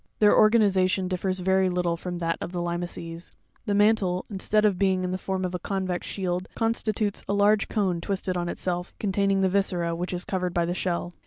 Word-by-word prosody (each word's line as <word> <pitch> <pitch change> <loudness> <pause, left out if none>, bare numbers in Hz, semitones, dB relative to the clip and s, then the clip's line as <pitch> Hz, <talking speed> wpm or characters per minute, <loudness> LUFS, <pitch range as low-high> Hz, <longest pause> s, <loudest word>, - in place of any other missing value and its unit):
— - - -45
Their 210 -1 +6
organization 195 -4 +4
differs 185 0 -2
very 190 0 +3
little 175 -1 0
from 175 +1 -5
that 165 -1 -1
of - - -4
the 175 - -2
limaces; 175 -1 -4 0.4
the 205 - +1
mantle, 200 -3 +2
instead 210 +2 +1
of 195 -4 +2
being 190 -2 +2
in 180 - -2
the 185 - -1
form 190 -1 -2
of 180 - -4
a 180 - -2
coavex 185 -1 -2
shield, 180 -1 -2
constitutes 220 -2 -1
a - - +2
large 205 +1 +3
cone 185 -5 0
twisted 190 0 -2
on 175 -1 -2
itself, 180 0 -3
containing 195 -1 +1
the 190 - +3
viscera, 180 -3 0
which 175 +2 -3
is 180 0 -4
covered 180 -2 -2
by 170 -1 +2
the 175 - -1
shell 175 -1 -2
(jig. - - -33
185 Hz, 215 wpm, -26 LUFS, 175-200 Hz, 0.4 s, Their